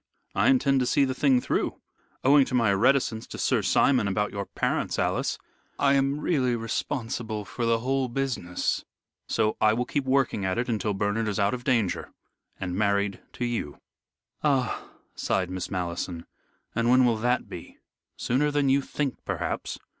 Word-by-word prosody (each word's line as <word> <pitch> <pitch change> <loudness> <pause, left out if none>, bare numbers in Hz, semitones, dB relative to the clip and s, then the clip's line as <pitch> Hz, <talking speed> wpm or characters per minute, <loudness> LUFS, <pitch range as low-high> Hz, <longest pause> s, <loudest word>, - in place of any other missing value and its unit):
I - - +3
intend 140 - +3
to 125 - +1
see 140 - +3
the 130 - -1
thing 135 -2 +3
through. - - -1 0.4
Owing 140 +1 +6
to 130 - -3
my 115 -5 +3
reticence 115 +1 +2
to - - -8
Sir - - +1
Simon 125 -7 +3
about 105 +2 0
your 100 -1 -4
parents, - - -1
Alice, - - 0 0.4
I 140 -1 +3
am 140 +1 +2
really 130 -7 +1
responsible 115 -2 -3
for 120 +2 -3
the 115 0 +3
whole 135 +1 0
business, 120 -8 -2 0.4
so 110 - +1
I 110 0 +5
will 125 +2 -1
keep 140 +1 -2
working 130 -6 +1
at 95 -1 0
it 120 - 0
until 110 -3 -1
Bernard 105 +3 0
is 105 - -1
out 100 +2 +2
of 125 -1 -4
danger 115 -8 0 0.5
and 90 -2 -3
married 100 -1 +1
to 120 - -3
you." 115 -12 -3 0.7
"Ah!" 135 -5 0 0.2
sighed 90 -1 -1
Miss 95 -1 -4
Malleson. 85 -1 -3 0.5
"And 115 +1 +1
when 130 +1 +6
will 115 -2 +2
that 125 +3 0
be?" - - -10 0.4
"Sooner 145 +5 +1
than 145 -2 +1
you 140 +1 +4
think, 140 -1 -3
perhaps. - - -3
120 Hz, 170 wpm, -26 LUFS, 105-135 Hz, 0.7 s, Owing